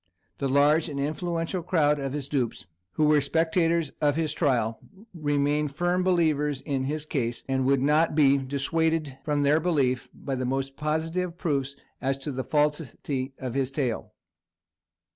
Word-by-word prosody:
The 140 - 0
large 145 +4 +3
and 140 -2 -4
influential 165 +4 -2
crowd 150 -4 +2
of 135 -1 -3
his 145 -2 -4
dupes, 130 -5 -2 0.3
who 155 - +2
were 150 -1 +5
spectators 165 +1 +1
of 145 -1 +3
his 155 -2 -1
trial, 120 -8 +1 0.3
remained 145 -2 0
firm 175 +3 +1
believers 155 -6 +2
in 135 -3 -2
his 150 +2 -3
case, 120 -6 -2
and 130 -1 0
would 135 -1 +3
not 150 +2 +3
be 140 -3 +5
dissuaded 145 +1 -1
from 145 -1 0
their 145 +2 +4
belief 140 -7 0
by 140 - -6
the 130 -1 -2
most 135 +1 -2
positive 165 +4 -2
proofs 140 -6 -1 0.3
as 135 0 0
to 135 +2 -5
the 130 -1 -3
falsity 145 -1 -1
of 130 -3 -5
his 135 -1 0
tale. 135 -5 -3
145 Hz, 160 wpm, -26 LUFS, 135-160 Hz, 0.3 s, were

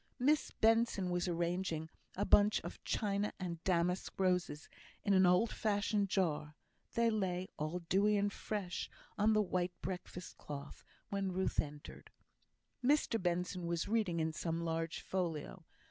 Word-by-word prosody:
Miss 290 +4 +3
Benson 225 -4 +2
was 175 +1 0
arranging 170 -1 -1 0.3
a 205 - 0
bunch 205 +1 +5
of - - -8
China 205 -1 0
and 170 -3 -4
damask 180 0 +1
roses 180 -5 +1 0.4
in 200 - +3
an 190 -1 +6
old 180 +6 +4
fashioned 205 -1 +1
jar; 155 -5 0 0.4
they 230 0 +3
lay, 185 -3 -1
all 155 +4 -2
dewy 205 +3 +3
and 200 0 +1
fresh, 195 -4 -3 0.3
on 215 +2 +3
the 215 0 +4
white 180 -2 -2
breakfast 180 -1 -6
cloth 140 0 -8 0.3
when 195 -1 -1
Ruth 190 +1 0
entered. 145 -1 -5 0.7
Mr 265 -5 +3
Benson 180 0 -1
was 170 0 -1
reading 205 -6 +1
in 160 0 0
some 165 +1 -2
large 165 0 -2
folio. 170 -5 -3
185 Hz, 145 wpm, -36 LUFS, 170-205 Hz, 0.7 s, an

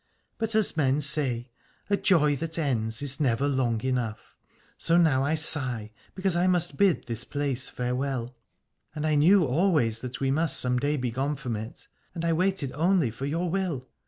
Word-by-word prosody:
But 225 -1 -1
as 215 -6 +2
men 140 -2 +2
say, 135 -4 -1 0.4
a 205 - +2
joy 155 -7 +3
that 165 +3 -4
ends 115 -6 -1
is 140 -1 0
never 135 -1 +1
long 130 -5 0
enough, 125 -4 -3 0.4
so 170 - +3
now 150 -6 +3
I 150 +3 +1
sigh 125 -8 +1 0.2
because 190 -1 -1
I 175 +2 +2
must 175 -1 +1
bid 195 -9 +2
this 115 -1 -3
place 135 -2 -2
farewell. 125 0 -3 0.6
And 155 0 -3
I 155 - +1
knew 170 +5 +5
always 135 - +1
that 125 0 -6
we 135 -1 0
must 155 +1 +2
some 125 0 +1
day 145 +3 0
be 125 -2 -2
gone 135 +5 -2
from 125 -4 -4
it: 110 +3 -8 0.3
and 170 0 -3
I 165 - +2
waited 180 -5 0
only 165 -5 +1
for 130 +5 -5
your 165 +5 -1
will. 170 -8 -2
145 Hz, 185 wpm, -26 LUFS, 125-165 Hz, 0.6 s, knew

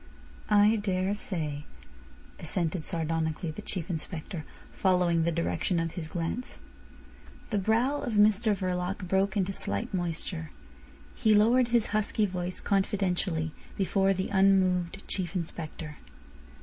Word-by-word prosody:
"I 210 +1 +5
daresay," 185 -6 -2 0.8
assented 165 0 -1
sardonically 165 -1 -1
the 155 - -8
Chief 175 -4 -2
Inspector, 165 -1 -5 0.3
following 180 -3 +2
the 170 - +2
direction 170 +1 0
of 165 -1 -1
his 160 -2 -5
glance. 170 +9 -4 0.9
The 210 - +2
brow 235 +8 +2
of 240 - -3
Mr 210 +1 +4
Verloc 185 0 -2
broke 190 +2 +1
into 195 0 0
slight 230 +3 -2
moisture. 170 -2 -3 0.6
He 220 -3 +3
lowered 235 +4 +5
his 235 -2 +2
husky 215 0 +1
voice 180 -2 -4
confidentially 190 -5 0 0.3
before 195 0 +2
the 190 +1 -2
unmoved 190 -2 +2
Chief 185 -1 -2
Inspector. 160 -3 -5
185 Hz, 120 wpm, -29 LUFS, 170-205 Hz, 0.9 s, I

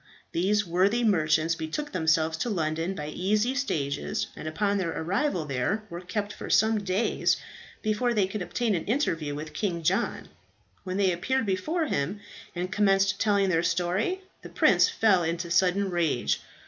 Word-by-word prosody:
These 205 +5 +1
worthy 190 +7 +2
merchants 160 -5 +2
betook 165 - -4
themselves 160 -2 +2
to 245 - -1
London 165 -1 -1
by 150 -3 -5
easy 210 +9 0
stages, 140 - -2
and - - -7
upon 200 +5 0
their 175 -3 -1
arrival 180 - 0
there 140 - -1
were 170 +1 -6
kept 205 +3 -3
for - - -8
some 220 0 +4
days 195 +4 +1 0.5
before 215 +3 +1
they 205 -3 +3
could 195 +2 -5
obtain 225 +4 -1
an 170 - -2
interview 165 - -1
with 155 +1 -7
King 170 -1 -2
John. - - 0 0.5
When 185 +1 -3
they 195 -2 +3
appeared 260 +9 0
before 255 - -1
him 190 - -2 0.4
and 180 +2 -3
commenced 195 -2 +2
telling 200 -3 +2
their 165 -2 +2
story, 180 - 0 0.2
the - - -10
prince - - +4
fell 205 -5 +3
into 170 +1 -2
sudden 190 +2 +2
rage. 155 - 0
185 Hz, 160 wpm, -27 LUFS, 165-210 Hz, 0.5 s, some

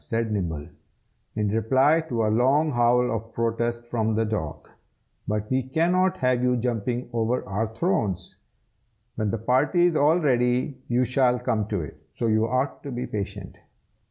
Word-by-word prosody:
said 115 -1 -2
Nibble, 85 -7 -3 0.7
in 105 -1 0
reply 130 +9 +3
to 115 -4 0
a 105 - +1
long 140 +7 +3
howl 125 0 +3
of 115 +1 -6
protest 115 +1 -1
from 110 -2 -1
the 110 +1 +1
dog. 80 -9 -4 0.6
"But 105 0 -2
we 130 0 +2
cannot 175 +8 +1
have 125 -3 +1
you 125 0 +2
jumping 120 +1 -2
over 115 +2 -1
our 100 +4 -1
thrones. 105 - -1 0.8
When 110 -2 -2
the 115 - -1
party 130 - +2
is 175 -2 +2
all 155 +3 +4
ready, 125 -2 +1
you 120 +1 +2
shall 125 0 +2
come 115 -4 -1
to 100 -5 -2
it, 75 - -11
so - - -4
you 110 0 +2
ought 130 +3 -1
to 140 - -7
be 125 0 -3
patient. 100 -2 -6
120 Hz, 165 wpm, -25 LUFS, 110-130 Hz, 0.8 s, all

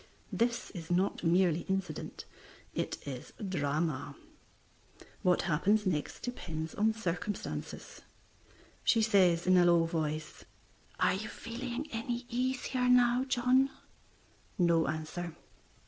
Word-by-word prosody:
This 240 +1 0
is 165 -4 -8
not 180 +2 +1
merely 170 -1 +3
incident; 190 -5 -3 0.5
it - - -2
is 130 -3 -7
drama. 150 -3 -1 1.1
What 180 -1 +3
happens 200 +6 +2
next 160 -6 -1
depends 165 -10 -5
on 220 +2 +2
circumstances. 195 -1 -4 0.8
She 225 -2 +4
says 185 -6 +4
in 185 0 +5
a 175 - +6
low 170 -1 +5
voice 155 -2 -3 0.6
"Are - - +4
you 215 +4 -4
feeling 245 +3 -5
any 235 +2 -3
easier 250 +1 0
now, 250 +1 +5
John?" 260 +1 +3 0.9
No 170 -2 +3
answer. 155 +2 -4
185 Hz, 110 wpm, -32 LUFS, 165-235 Hz, 1.1 s, a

